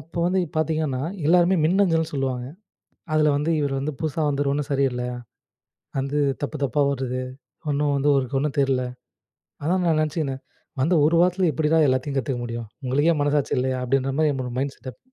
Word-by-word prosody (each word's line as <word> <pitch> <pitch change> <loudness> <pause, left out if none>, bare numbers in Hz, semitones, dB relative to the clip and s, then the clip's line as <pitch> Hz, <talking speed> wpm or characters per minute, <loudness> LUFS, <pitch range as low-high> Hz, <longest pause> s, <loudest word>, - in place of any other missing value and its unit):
அப்போ 165 +4 -9
வந்து 185 +1 +2 0.2
பார்த்தீங்கன்னா 155 -4 0 0.2
எல்லாருமே 175 +2 +4
மின்னஞ்சல்னு 165 -3 +2
சொல்லுவாங்க. 130 -3 -2 0.7
அதில 155 -1 +4
வந்து 150 +3 -1
இவரு 140 -1 -1
வந்து 150 +3 -2
புதுசா 155 0 -2
வந்தவரு 140 -1 0
ஒன்னும் 145 0 -3
சரியில்ல. 135 -3 +1 1.0
வந்து 140 +2 -1 0.2
தப்பு 145 +2 -3
தப்பா 140 +2 +1
வருது, 130 -1 -3 0.5
ஒன்னு 145 0 +1
வந்து 140 +1 +1
அவருக்கு 135 0 0
ஒன்னும் 150 +1 -2
தெரியல. 135 -2 +2 0.8
அதான் 180 +4 +1
நான் 160 -2 +3
நெனச்சுகினே 155 -2 -1 0.5
வந்து 165 +7 +3
1 160 +3 +3
வாரத்துல 180 +1 +3
எப்படிடா 155 +3 +1
எல்லாத்தையும் 130 +2 0
கத்துக்க 130 -1 -1
முடியும். 115 -1 -5 0.2
உங்களுக்கே 145 +6 +3
மனசாட்சி 145 -1 +1
இல்லையா, 130 0 0
அப்படின்ற 135 +1 +1
மாரி 155 -1 +3
என்னோட 130 -2 -3
மைண்ட் 135 +1 -1
செட்டப் 130 -2 -10
145 Hz, 165 wpm, -24 LUFS, 135-155 Hz, 1.0 s, எல்லாருமே